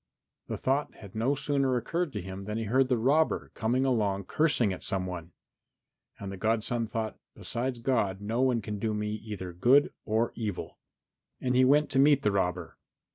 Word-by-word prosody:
The - - -3
thought 135 +3 0
had 100 -3 -12
no 120 +6 +1
sooner 135 -2 +1
occurred 165 +7 -2
to 105 -4 -4
him 95 +1 -7
than 105 +1 -3
he 115 - -2
heard 130 +5 +2
the 125 - +3
robber 145 +7 +2
come 115 +2 0
along 110 -7 +1
cursing 120 - +2
at 90 - -8
some 95 -1 0
one. 90 -2 -6 0.9
And 100 -1 -6
the 100 - -6
godson 115 +2 0
thought, 110 -1 -4 0.2
"Besides 125 +1 -3
God 115 -6 0
no 110 +4 -1
one 125 -4 +2
can 105 0 -4
do 110 0 -1
me 105 0 -2
either 105 -4 -6
good 125 +11 +4
or 110 +2 0
evil." 105 -5 -5 0.6
And 125 -1 0
he 130 - +5
went 145 +3 +4
to 135 - +2
meet 140 0 +5
the 105 - +3
robber. 90 -3 -2
115 Hz, 185 wpm, -29 LUFS, 100-130 Hz, 0.9 s, he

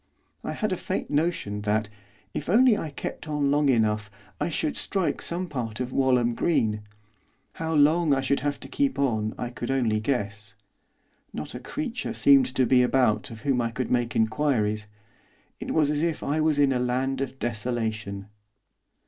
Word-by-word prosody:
I - - -3
had - - -2
a - - +1
faint - - -3
notion 145 -10 0
that, 105 +1 0 0.5
if 150 - -4
I - - +2
only 245 0 +6 0.2
kept 155 - -6
on 145 -2 0
long 145 0 +3
enough, 105 -4 +2 0.3
I 150 - 0
should 155 -1 -1
strike 190 -4 -1
some 180 +2 -3
part 120 -8 -4
of 125 0 -3
Walham 125 -3 +3
Green. 110 -7 +1 0.8
How 160 0 -1
long 155 +2 +4
I 135 -1 +3
should 135 +1 +1
have 145 +1 -2
to - - -7
keep 280 -1 0
on 110 -6 0
I 120 -1 -4
could 120 -1 -5
only 120 -5 +1
guess. 110 -3 -3 0.8
Not 75 - -6
a 125 - -6
creature 250 - -4
seemed 275 -2 +6
to 130 - +3
be 125 0 +5
about 125 -4 +2
of 110 -1 -10
whom 130 -2 +1
I 115 - 0
could 125 +2 -4
make 120 -1 0
inquiries. 110 -3 +1 0.7
It - - -6
was 150 -2 +2
as 150 0 0
if 165 -2 -1
I 150 +2 0
was 155 -1 +2
in 140 -2 +4
a 125 - 0
land 130 +2 0
of 135 -1 -4
desolation. 110 -4 -3
130 Hz, 180 wpm, -26 LUFS, 110-150 Hz, 0.8 s, only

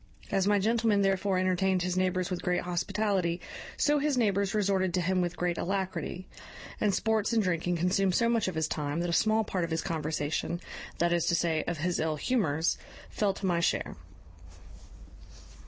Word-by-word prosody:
As 195 -1 +2
my 205 0 +4
gentleman 220 0 +2
therefore 195 0 +1
entertained 185 0 +1
his 180 0 -1
neighbours 185 0 0
with 180 - -2
great 180 0 0
hospitality, 180 0 -1 0.4
so 295 0 +3
his 290 -2 0
neighbours 200 -3 +1
resorted 190 -3 +1
to 180 - +1
him 185 +1 +1
with 175 0 -2
great 175 -1 -1
alacrity; 190 -1 -3 0.5
and 210 - +2
sports 220 +2 0
and 225 -2 +3
drinking 175 -1 0
consumed 180 +2 +1
so 235 - +3
much 230 -3 +1
of 185 - -3
his 160 -1 0
time, 150 +2 -2
that 175 0 -1
a - - -1
small 220 +4 +3
part 185 -4 -2
of 170 - -2
his 160 0 -1
conversation, 155 +1 -2 0.4
that 170 0 +2
is 170 -1 +1
to 170 - +3
say, 165 -2 +1
of 175 - -2
his 175 +4 -1
ill 155 -1 0
humours, 160 - 0 0.3
fell 200 -2 0
to 195 - -5
my 175 -2 +2
share. 170 - 0
185 Hz, 185 wpm, -29 LUFS, 170-200 Hz, 0.5 s, my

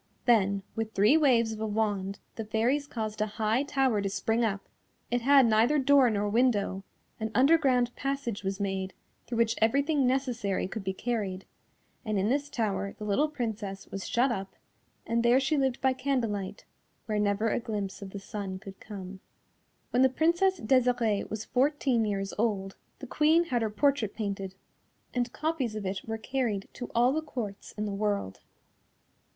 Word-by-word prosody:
Then, 200 -5 +3
with 225 -1 -3
three 210 +9 +5
waves 245 -7 +4
of 220 - -6
a 220 - -1
wand, 205 -2 -1 0.2
the 225 - -5
Fairies 235 +7 0
caused 215 -4 -4
a 215 - +2
high 220 +3 +2
tower 270 -6 +1
to 200 - -1
spring 220 +4 0
up; 200 -3 -2 0.4
it 245 0 +1
had 275 +1 +6
neither 230 +6 +4
door 275 -2 +5
nor 205 -1 0
window, 205 -4 +1 0.4
an 220 0 -2
underground 255 -3 +4
passage 275 -6 -3
was 195 +1 -2
made, 190 -1 -2 0.3
through 240 - -3
which 230 -1 +3
everything 280 +4 +3
necessary 245 -8 0
could 210 +1 -6
be 190 - -1
carried, 195 -3 -3 0.6
and 215 -3 -1
in 195 +3 +1
this 285 +3 0
tower 200 -5 -2
the - - -8
little 210 +9 +2
Princess 220 -8 -4
was 195 -1 -5
shut 250 +2 +2
up 195 -3 -4 0.5
and 230 0 +1
there 240 +2 +5
she 270 +3 +1
lived 265 -3 +1
by 265 -1 +3
candlelight, 230 -8 -2 0.4
where 215 -1 -1
never 210 +2 +1
a - - 0
glimpse 210 -5 -4
of 200 - -7
the 200 - -7
sun 195 -2 -5
could 195 0 -11
come. 195 -3 -8 0.7
When 250 - +3
the 265 - +6
Princess 340 +7 +2
Desirée 240 -3 +2
was 215 0 -4
fourteen 260 -3 +1
years 195 -2 -2
old, 200 -4 0 0.2
the 270 - -8
Queen 310 +6 +3
had 250 -8 -1
her 220 - 0
portrait 235 0 +1
painted, 195 -3 -4 0.6
and 245 -1 -1
copies 300 -8 -2
of 210 -2 -4
it 190 0 -3
were 225 0 -2
carried 220 -4 -2
to 245 - -7
all 245 +3 +4
the 315 - 0
Courts 235 -10 -6
in 210 - -1
the 205 - -3
world. 200 - -2
225 Hz, 175 wpm, -29 LUFS, 200-260 Hz, 0.7 s, had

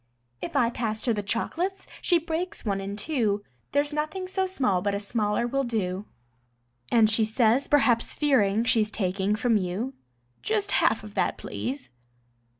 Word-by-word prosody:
If 335 - -5
I 240 -4 +3
pass 220 -3 -2
her 235 - +2
the 210 - -1
chocolates 350 - -2 0.2
she 350 - +4
breaks 335 +3 -3
one 195 -2 0
in 200 +1 -4
two, 210 -4 0 0.3
There's 290 +1 +1
nothing 310 +5 -2
so 380 0 0
small 255 - +1
but 200 +1 0
a - - -1
smaller 210 +1 0
will 275 +3 0
do, 205 -5 -2 0.9
And 225 -2 +6
she 220 +1 +3
says, 225 +4 +2
perhaps 250 -5 +3
fearing 225 -8 +3
she's 220 -3 +2
taking 195 0 0
from 225 0 +2
you: 200 +8 -2 0.5
"Just 425 -2 0
half - - +2
of - - -10
that, - - 0
please." 265 +2 -5
230 Hz, 160 wpm, -26 LUFS, 205-290 Hz, 0.9 s, And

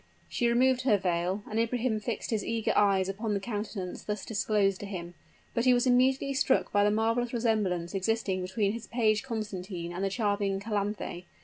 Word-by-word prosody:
She 240 - 0
removed 255 +1 +3
her 235 -6 +4
veil; 180 +2 -1
and 220 - -2
Ibrahim 230 -1 0
fixed 225 +2 -4
his 220 -2 0
eager 225 -1 0
eyes 195 -2 +3
upon 210 +2 -2
the - - 0
countenance 205 -3 -4
thus 210 -1 -4
disclosed 205 -3 +1
to 205 - -6
him; 175 -3 -6 0.4
but 235 - 0
he 250 -1 +6
was 245 - +2
immediately 260 +2 +3
struck 265 0 +2
by 205 - +3
the 205 - +4
marvelous 230 +3 +1
resemblance 210 -7 0
existing 195 -1 0
between 195 +2 0
his 230 +1 -6
page 220 -3 +2
Constantine, 195 -8 -5
and 185 +2 -3
the 195 - +1
charming 200 -2 0
Calanthe. 200 -3 -3
210 Hz, 185 wpm, -29 LUFS, 195-230 Hz, 0.4 s, he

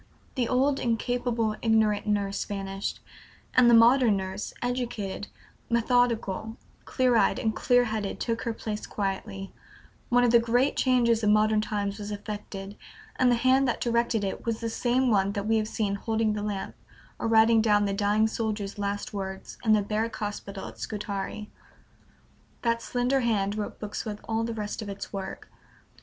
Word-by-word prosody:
The 250 -4 0
old 270 +2 +2
incapable, 235 -1 0
ignorant 220 -2 +2
nurse 200 -1 0
vanished, 195 -1 -4 0.5
and 250 -1 +6
the 235 - +7
modern 230 -2 +6
nurse, 190 +1 -4
educated, 240 -5 -3 0.4
methodical, 230 -3 +1 0.3
clear 255 -2 +2
eyed 225 - +3
and 220 -1 -1
clear 245 -1 +3
headed, 215 -3 -3
took 230 -1 -2
her 230 - -2
place 215 -1 -5
quietly; 195 -1 -4 0.6
one 245 0 +4
of 240 - +4
the 235 - +7
great 245 +4 +2
changes 240 -3 +3
of 210 - +3
modern 215 0 +4
times 205 -1 -3
was 205 0 -5
effected, 205 -1 -6 0.4
and 255 - +4
the - - +4
hand 260 +3 +3
that 240 - -1
directed 235 -2 +1
it 195 - -3
was 230 -1 -2
the 230 -1 -3
same 250 +2 +1
one 200 -1 +2
that 200 0 -3
we 225 +1 +2
have 215 -1 0
seen 210 -2 -1
holding 220 +1 0
the 210 - -3
lamp, 205 -2 -4 0.5
or - - -1
writing 225 0 +5
down 210 -2 +3
the 200 - -1
dying 205 +2 +2
soldier's 215 -2 -3
last 205 +1 -3
words, 190 -1 -6
in 220 -2 +4
the 210 -1 +3
Barrack 220 +3 -2
Hospital 205 -1 -5
at - - -12
Scutari. 210 0 -5 1.1
That 230 -1 +1
slender 250 +3 0
hand 210 -5 0
wrote 210 -1 -5
books 210 -1 -4
with 210 -2 -5
all 225 0 0
the 230 0 -4
rest 210 0 -4
of 210 - -6
its 200 0 -7
work. 195 -1 -6
220 Hz, 170 wpm, -27 LUFS, 205-235 Hz, 1.1 s, the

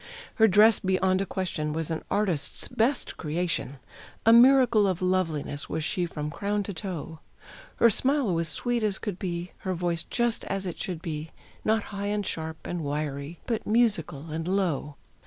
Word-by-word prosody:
Her 220 -2 +6
dress 215 +2 +6
beyond 190 0 +1
a 195 - -2
question 165 -5 -2
was 160 +1 -2
an 160 - -2
artist's 195 -8 0
best 245 +5 0
creation; 160 -3 -2 0.5
A 225 - +7
miracle 240 -3 +6
of 185 -2 -1
loveliness 165 -6 -1
was 160 - -2
she 175 +2 -1
from 150 -2 -5
crown 205 +4 -1
to 200 - -5
toe. 170 -4 -5 0.6
Her 235 - +5
smile 260 -2 +2
was 165 -1 0
sweet 240 +9 0
as 210 -3 +1
could 200 -5 -5
be, 175 -1 -4
her 185 -1 -3
voice 170 -1 -1
just 240 -1 0
as 195 0 -2
it 180 - -5
should 175 -3 -4
be 155 -2 -4 0.3
Not 220 0 +2
high, 200 0 -3
and 205 0 -1
sharp, 160 -2 -5
and 175 -2 -3
wiry, 145 +2 -4
but 230 -2 -2
musical 175 - +1
and 160 +2 -3
low. 180 -7 -1
185 Hz, 175 wpm, -27 LUFS, 160-210 Hz, 0.6 s, A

